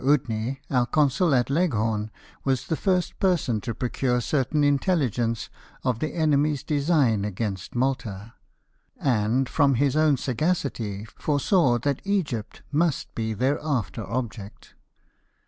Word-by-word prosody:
Udney, 130 -3 +1
our 125 -3 +2
consul 150 +4 +3
at 125 +1 +1
Leghorn, 110 -10 +1 0.3
was 130 -2 0
the 160 - -1
first 180 0 0
person 165 - +1
who 115 -3 -3
procured 125 -1 0
certain 145 +2 +1
intelligence 135 - +1 0.3
of 125 -3 0
the 155 - -3
enemy's 150 -3 +2
design 140 - +2
against 100 -1 -4
Malta; 115 -5 -2 0.7
and, 125 0 +1
from 140 -1 +3
his 140 +2 +2
own 155 -2 +4
sagacity, 125 - -2
foresaw 145 - +1
that 140 +3 -1
Egypt 145 - -2
must 155 0 0
be 110 -1 -2
their 130 +7 +1
after 125 -7 -2
object. 115 -3 -5
130 Hz, 125 wpm, -25 LUFS, 115-150 Hz, 0.7 s, own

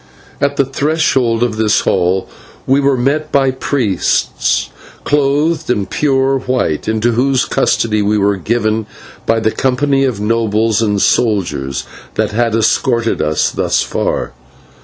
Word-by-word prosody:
At 140 0 +1
the 140 - +3
threshold 135 -4 +1
of 115 -3 -1
this 110 -1 +2
hall 95 0 0 0.4
we 135 +2 +3
were 140 -1 +2
met 150 +5 -1
by 135 -1 +3
priests 125 -7 0 0.3
clothed 150 +3 +1
in 105 -5 0
pure 135 +3 +1
white, 125 - -1
into 110 +2 +1
whose 130 +2 +1
custody 105 -2 +1
we 105 +1 +1
were 100 0 +1
given 110 +2 -1 0.4
by 115 0 +2
the 110 0 0
company 135 +2 +1
of 125 -6 -2
nobles 110 0 +1
and 105 -2 +1
soldiers 80 - 0 0.3
that - - 0
had 115 +1 0
escorted 115 +1 +1
us 75 0 0
thus - - 0
far. - - -2
115 Hz, 135 wpm, -15 LUFS, 105-135 Hz, 0.4 s, the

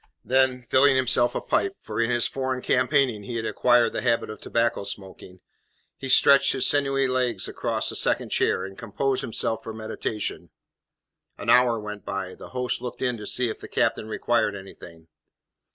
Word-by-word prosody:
Then, 130 -1 +2
filling 135 +3 +4
himself 125 -1 +2
a - - -1
pipe 390 -1 0
for - - -4
in 115 - +1
his 120 -1 +2
foreign 130 -1 -3
campaigning 130 -3 +2
he 115 +4 -7
had 115 -1 -2
acquired 120 -1 +3
the - - -2
habit 115 -3 0
of 110 - -10
tobacco 115 -3 0
smoking 95 -2 -9 0.5
he 135 - -7
stretched 140 +2 +5
his 130 - +1
sinewy 135 -1 +2
legs 130 -2 0
across - - -2
a - - -8
second - - 0
chair, - - +1
and 95 0 -9
composed 125 +6 -2
himself 115 0 -2
for 110 - -7
meditation. 110 -1 -4 0.9
An - - 0
hour 125 -2 +4
went 105 -1 -7
by; 95 -1 -4
the - - -12
host 125 -2 -2
looked 125 +1 -6
in 125 -2 0
to 105 - -8
see 125 - +1
if - - -6
the - - -9
captain 110 - 0
required 110 -1 0
anything. 85 -4 -12
120 Hz, 180 wpm, -25 LUFS, 110-130 Hz, 0.9 s, stretched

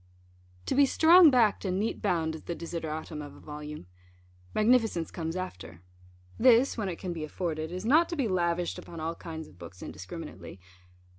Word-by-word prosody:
To - - -1
be 280 0 +5
strong 335 +4 +7
backed 235 -6 +3
and 190 -1 -1
neat 220 +2 -2
bound 170 -6 0
is 160 - -8
the 170 - -3
desideratum 160 -2 -5
of 145 -1 -9
a - - -14
volume. 150 -5 -8 0.7
Magnificence 220 -6 +2
comes 165 -1 -4
after. 90 - -7 0.6
This, 250 +1 +5
when 210 -4 -2
it 175 - -3
can 180 -2 -4
be 160 -2 -5
afforded, 155 0 -3
is 185 +3 -5
not 310 +8 +4
to 345 - -3
be 275 -7 0
lavished 175 -2 0
upon 170 - -10
all 160 +1 -2
kinds 160 -2 -8
of 90 - -19
books 85 +2 -10
indiscriminately. - - -8
170 Hz, 175 wpm, -29 LUFS, 160-220 Hz, 0.7 s, strong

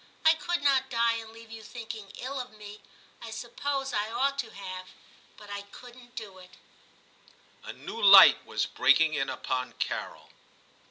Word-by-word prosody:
I 320 - +8
could 350 -1 -3
not 265 -2 +2
die 235 -2 +2
and 225 -1 -9
leave 225 0 -14
you 225 -1 -9
thinking 220 -2 -9
ill 270 +2 -5
of 250 0 -6
me. 210 0 -12 0.4
I 230 - -8
suppose 270 +4 -4
I 210 +1 -1
ought 275 +4 0
to 235 -5 -3
have, 185 -2 -8 0.5
but 205 -1 -13
I 200 0 -4
couldn't 245 +4 -15
do 205 -5 -8
it' 180 0 -16 1.1
A - - -7
new 460 - -8
light - - +9
was - - -2
breaking 160 -1 +3
in 135 -3 -1
upon 130 -1 -3
Carol. - - -5
230 Hz, 165 wpm, -28 LUFS, 205-260 Hz, 1.1 s, light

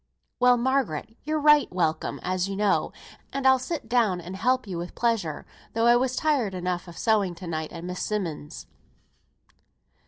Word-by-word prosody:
"Well, 250 0 +5
Margaret, 240 - -1
you're 310 +1 0
right 300 0 +5
welcome 160 -3 -1
as 185 +1 -1
you 195 - -3
know, 205 0 +1 0.4
and 275 0 -3
I'll 265 0 +6
sit 260 -1 -4
down 225 -7 +2
and 175 +2 -7
help 255 +5 +1
you 180 -4 -5
with 175 +1 -7
pleasure, 220 -11 -1 0.3
though 225 0 +2
I 240 0 +7
was 255 +1 +1
tired 265 -12 +1
enough 180 0 -3
of 170 - -11
sewing 205 -6 +1
to 180 - -9
night 160 -2 -4
at 165 - -8
Miss 180 0 -5
Simmonds'." 170 -8 -4
210 Hz, 175 wpm, -26 LUFS, 180-250 Hz, 0.4 s, I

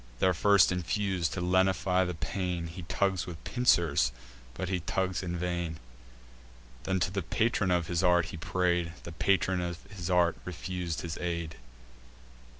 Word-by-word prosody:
These 95 +4 +3
first 100 +2 +5
infus'd, 90 -1 -1
to 90 - -3
lenify 95 0 +2
the 90 - -3
pain, 90 0 -2
He 85 +3 -7
tugs 95 +2 0
with 85 -3 -8
pincers, 85 - +3 0.4
but 90 - -3
he 90 0 0
tugs 95 +2 -1
in 90 -2 -3
vain. 85 -2 -2 1.1
Then 95 0 +1
to 90 - +1
the 100 +1 -1
patron 105 +3 +1
of 90 -2 +2
his 85 0 -1
art 90 -2 +4
he - - -5
pray'd: 85 0 0
The 85 - -7
patron 95 +1 +1
of 85 -1 -3 0.2
his 90 -2 -4
art 90 -2 +3
refus'd 90 -1 -4
his 85 -2 -5
aid. 85 -2 -3
90 Hz, 155 wpm, -30 LUFS, 85-95 Hz, 1.1 s, first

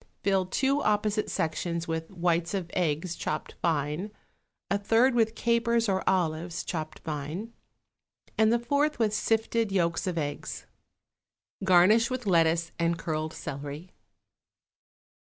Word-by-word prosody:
Fill 195 -2 +2
two 275 +8 +1
opposite 210 0 +1
sections 170 +1 -2
with 160 0 -3
whites 175 -1 0
of 175 -3 -4
eggs 165 0 -1
chopped - - -4
fine, 155 +4 0 0.6
a 200 - +3
third 230 +5 +3
with 225 -1 +2
capers 235 0 +2
or 190 -1 0
olives 170 -2 -1
chopped 155 -2 -4
fine, 155 +9 -5 0.8
and 220 0 +4
the 235 - +4
fourth 285 +5 +1
with 220 -3 +1
sifted 225 0 +1
yolks 170 -2 0
of 180 -2 -2
eggs. 145 -2 -4 1.0
Garnish 190 +5 +5
with 255 -2 -3
lettuce 165 -2 +3
and 170 0 +1
curled 155 -1 -3
celery. 145 +5 -7
185 Hz, 125 wpm, -28 LUFS, 165-220 Hz, 1.0 s, Garnish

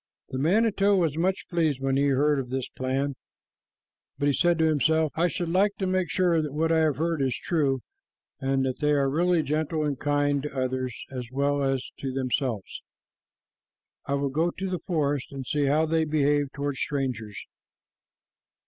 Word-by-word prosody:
The 130 - -4
manito 200 +5 +3
was 165 -6 +1
much 185 +4 0
pleased 160 -6 0
when 135 0 0
he 140 +1 +3
heard 140 +1 +2
of 125 -2 -5
this 130 0 -2
plan, 135 +2 -2 1.0
but 140 - -1
he 145 - +3
said 175 +3 +3
to 160 - +3
himself, 160 0 +2
"I 170 +2 +2
should 170 +1 -3
like 200 +4 +2
to 195 - -1
make 185 -1 0
sure 175 -3 +2
that 150 -3 -4
what 160 +2 +1
I 165 - +4
have 155 -3 +2
heard 165 +1 -1
is 130 -2 0
true, 140 -6 0 0.6
and 135 0 0
that 130 -1 -2
they 150 -1 +2
are 140 -1 +2
really 170 +3 +2
gentle 155 +1 -1
and 145 -3 -2
kind 145 -1 +1
to 145 -1 -6
others 130 -1 -2
as 125 -3 -5
well 140 +1 +1
as 135 -1 0
to 135 - -3
themselves. 130 -4 -2 1.3
I 140 - +1
will 140 0 0
go 160 +5 +1
to 190 +2 -4
the 180 - -1
forest 145 -6 -1
and 135 -2 -6
see 145 +2 0
how 150 +3 +3
they 160 0 +1
behave 145 -2 +1
toward 140 -1 -3
strangers." 125 -8 -3
145 Hz, 185 wpm, -26 LUFS, 135-165 Hz, 1.3 s, I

